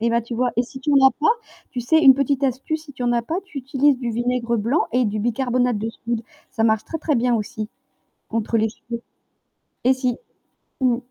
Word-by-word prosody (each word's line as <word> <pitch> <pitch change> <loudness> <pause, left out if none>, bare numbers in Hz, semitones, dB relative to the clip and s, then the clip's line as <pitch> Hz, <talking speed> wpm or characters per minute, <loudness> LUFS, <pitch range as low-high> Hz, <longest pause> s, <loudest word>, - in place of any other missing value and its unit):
Et 235 +1 +2
bah 235 0 +2
tu 235 +2 -7
vois 245 +1 +1
et 240 - +3
si 260 +2 -10
tu 295 +3 -1
en 275 -1 +6
as - - +2
pas, 305 - +4 0.4
tu 250 - -3
sais 315 +7 +3
une 270 - +10
petite 275 +1 0
astuce, 270 +4 -1
si 285 - -12
tu 250 - -5
en 240 - +2
as 235 - +2
pas, 330 +10 -2
tu 320 -7 -9
utilises 270 +1 +2
du 240 -2 -2
vinaigre 240 0 0
blanc 235 +9 +1
et 250 +1 +2
du 210 0 -2
bicarbonate 245 +1 +1
de 220 +2 -3
soude. 230 0 -4 0.3
Ça 225 -4 -1
marche 220 -1 +3
très 325 - -4
très 305 -2 0
bien 240 0 +2
aussi 215 0 -4 0.6
contre 225 0 0
les 220 +1 +2
cheveux. 235 +2 -8 0.8
Et 260 +2 +5
si, 255 -1 -1 0.6
mmh. 245 -2 +3
245 Hz, 225 wpm, -22 LUFS, 230-265 Hz, 0.8 s, une